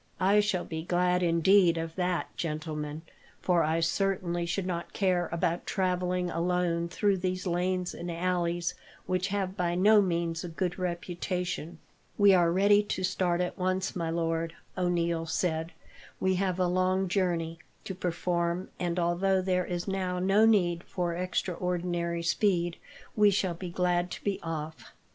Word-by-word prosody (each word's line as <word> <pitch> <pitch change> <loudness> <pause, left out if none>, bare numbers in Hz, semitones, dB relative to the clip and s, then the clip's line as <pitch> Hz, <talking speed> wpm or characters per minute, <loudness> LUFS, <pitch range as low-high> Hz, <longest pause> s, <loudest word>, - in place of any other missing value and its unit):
"I 195 +3 +4
shall 205 -4 0
be 160 -1 -4
glad, 180 +1 +1
indeed, 170 +1 +4
of 165 0 -4
that, 180 -1 -1
gentlemen, 155 -1 -4 0.4
for 175 -2 +2
I 160 +2 +1
certainly 175 0 0
should 180 +2 -1
not 170 -2 -4
care 180 -3 +1
about 170 +1 -1
travelling 180 -1 0
alone 170 0 0
through 200 +2 +1
these 185 +1 -2
lanes 180 0 -1
and 175 - -6
alleys, 175 0 -1 0.3
which 185 0 0
have 195 -1 -2
by 175 -2 0
no 205 +3 +6
means 170 -3 -1
a 175 - -5
good 180 +2 -3
reputation." 175 -1 -3 0.4
"We 205 -1 +6
are 175 -2 +4
ready 200 +3 +5
to 205 -2 -3
start 180 -1 +1
at 180 +2 -3
once, 185 +1 -1
my 170 -2 -2
lord," 165 0 -1 0.2
O'Neil 170 -2 0
said. 160 0 -1 0.5
"We 190 0 +2
have 185 -1 0
a 185 - +3
long 185 +1 +1
journey 170 -3 -1 0.2
to 190 - -5
perform, 175 0 -1
and, 175 -1 -1
although 180 +2 +2
there 180 -1 0
is 175 +1 -4
now 185 -2 -1
no 195 +4 +4
need 175 -6 +2
for 175 -2 -2
extraordinary 175 -1 -2
speed, 175 -1 +1 0.4
we 210 -1 +6
shall 190 -2 0
be 175 +1 -6
glad 175 0 0
to - - -8
be 200 -1 -1
off." 160 -1 -6
180 Hz, 155 wpm, -29 LUFS, 170-185 Hz, 0.5 s, no